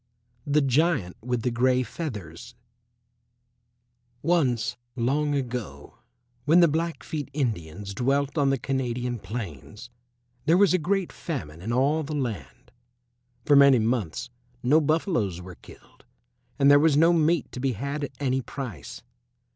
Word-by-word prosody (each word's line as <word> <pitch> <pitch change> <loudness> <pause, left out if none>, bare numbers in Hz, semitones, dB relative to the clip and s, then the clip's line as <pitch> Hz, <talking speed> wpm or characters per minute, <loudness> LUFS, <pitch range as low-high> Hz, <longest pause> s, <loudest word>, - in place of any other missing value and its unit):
THE 145 0 +3
GIANT 135 - +1
WITH 120 0 -2
THE 125 - 0
GREY 125 +2 +2
FEATHERS 115 - -7 1.7
Once 140 -9 +1 0.2
long 145 +5 0
ago, 120 - -5 0.5
when 160 +4 +5
the 170 - +7
Blackfeet 160 -2 -3
Indians 100 - -3
dwelt 140 +6 0
on 140 -3 +2
the 135 - +1
Canadian 125 -2 -2
plains, 105 - -8 0.6
there 165 +3 +5
was 200 -2 +5
a 185 - +3
great 190 +3 -1
famine 85 - -6
in 110 +5 -4
all 140 +6 +2
the 155 0 -5
land. 115 - -5 0.7
For 145 - +5
many 140 -2 +7
months 115 0 -1 0.3
no 150 +6 +4
buffaloes 145 - 0
were 90 0 -9
killed, - - -18 0.5
and 140 0 +5
there 145 - +7
was 150 -1 +3
no 165 +3 +5
meat 165 -1 +1
to - - -7
be 130 0 0
had 140 +6 -4
at - - -9
any 130 -2 0
price. 120 - -8
130 Hz, 140 wpm, -26 LUFS, 115-150 Hz, 1.7 s, the